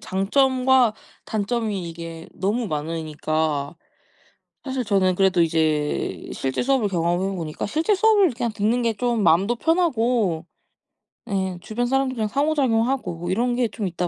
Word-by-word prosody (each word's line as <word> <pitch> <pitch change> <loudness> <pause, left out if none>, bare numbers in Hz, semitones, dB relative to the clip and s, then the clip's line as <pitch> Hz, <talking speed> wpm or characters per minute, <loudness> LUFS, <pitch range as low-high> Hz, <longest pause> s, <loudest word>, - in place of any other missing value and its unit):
장점과 255 +4 +2 0.3
단점이 215 -4 -2
이게 165 0 -8
너무 215 +6 -1
많으니까 155 -1 -2 0.9
사실 265 -2 -2
저는 195 -4 +2
그래도 185 -2 +3
이제 155 -2 -1
실제 135 - -2
수업을 265 -4 +2
경험해 175 +2 0
보니까 160 -1 -4
실제 315 - +1
수업을 410 -3 +4
그냥 235 -2 -2
듣는 220 +4 +1
게 230 -1 +1
좀 240 0 0
마음도 195 +7 +3
편하고 240 - +1 0.8
예 190 -2 -1
주변 235 +5 -2
사람들이랑 260 -4 0
상호작용하고 255 - 0
이런 240 +6 +1
게 245 -1 +1
좀 215 -2 -4
있다 175 0 -2
210 Hz, 305 characters per minute, -23 LUFS, 170-250 Hz, 0.9 s, 수업을